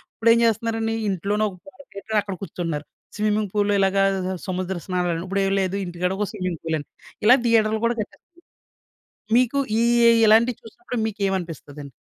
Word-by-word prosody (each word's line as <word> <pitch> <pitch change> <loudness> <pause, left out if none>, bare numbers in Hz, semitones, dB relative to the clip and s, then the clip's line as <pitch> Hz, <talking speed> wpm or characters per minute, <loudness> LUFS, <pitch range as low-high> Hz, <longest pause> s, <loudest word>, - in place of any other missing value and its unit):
ఇప్పుడు 230 0 +3
ఏం 230 - +3
చేస్తున్నారండి, 225 0 0
ఇంట్లోనే 200 +3 0
ఒక 185 - -13
పార్క్ 280 0 -18
పెట్టి 215 +2 -1
అక్కడ 200 -2 -6
కూర్చుంటున్నారు. 165 -6 -4 0.3
స్విమ్మింగ్ 210 -1 0
పూల్‌లో, 205 -1 +1
ఇలాగా 195 0 +3 0.4
సముద్ర 185 0 -2
స్నానాలని, 180 -2 -1
ఇప్పుడు 195 +1 0
ఏమి 195 0 +1
లేదు. 190 +1 -1
ఇంటికాడ 180 +1 -2
ఒక 210 - 0
స్విమ్మింగ్ 185 -5 -3
పూల్ 160 -1 -1
అని. 145 - -10 0.4
ఇలా 245 +5 +8
థియేటర్‌లు 220 -1 +2
కూడా 235 +1 +1
కట్టెస్తన్నారు. 210 - -10 1.1
మీకు 255 +2 +1 0.2
ఈ - - +3 0.3
ఏ - - +8 0.2
ఇలాంటివి 225 +2 +4
చూసినప్పుడు 245 +2 -7
మీకేమనిపిస్తదండి? 175 -9 -4
200 Hz, 160 wpm, -23 LUFS, 180-225 Hz, 1.1 s, ఇలా